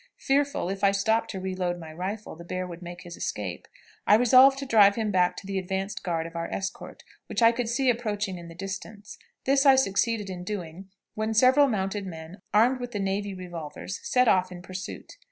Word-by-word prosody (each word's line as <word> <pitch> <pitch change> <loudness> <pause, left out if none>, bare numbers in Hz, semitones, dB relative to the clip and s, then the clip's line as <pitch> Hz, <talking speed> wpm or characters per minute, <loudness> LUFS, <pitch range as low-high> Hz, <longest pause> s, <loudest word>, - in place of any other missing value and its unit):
Fearful, 280 -4 0
if 195 +1 -5
I 200 - +6
stopped 220 +3 +1
to 190 - -5
reload 185 -1 -2
my 160 -2 -9
rifle, 195 +5 -5
the 170 - -11
bear 185 +1 -4
would 175 -1 -9
make 175 +1 -9
his 175 -1 -9
escape, 95 -4 -5 0.4
I 210 - +7
resolved 255 +4 +6
to 275 - -5
drive 205 -5 +6
him 220 -2 -1
back 180 -2 +2
to - - -8
the 195 0 -2
advanced 190 +2 -3
guard 165 -2 -1
of 165 0 -9
our 170 0 -3
escort, 195 0 -5 0.2
which - - -1
I 230 - +8
could 235 -1 -3
see 265 +3 0
approaching 210 -6 -1
in 170 - -10
the 165 - -11
distance; 195 +2 -7 0.3
this 275 +1 +3
I 275 -2 +7
succeeded 225 -3 +1
in 180 -2 -6
doing, 185 -1 -6 0.2
when 220 +1 -2
several 260 +5 +6
mounted 195 -3 -2
men, 165 +1 -9
armed 240 +5 +4
with 245 0 -6
the 205 - -2
navy 195 0 -2
revolvers, 175 -1 -7
set 250 -1 +2
off 185 -3 +3
in 175 -1 -9
pursuit. 185 - -8
195 Hz, 210 wpm, -27 LUFS, 180-225 Hz, 0.4 s, I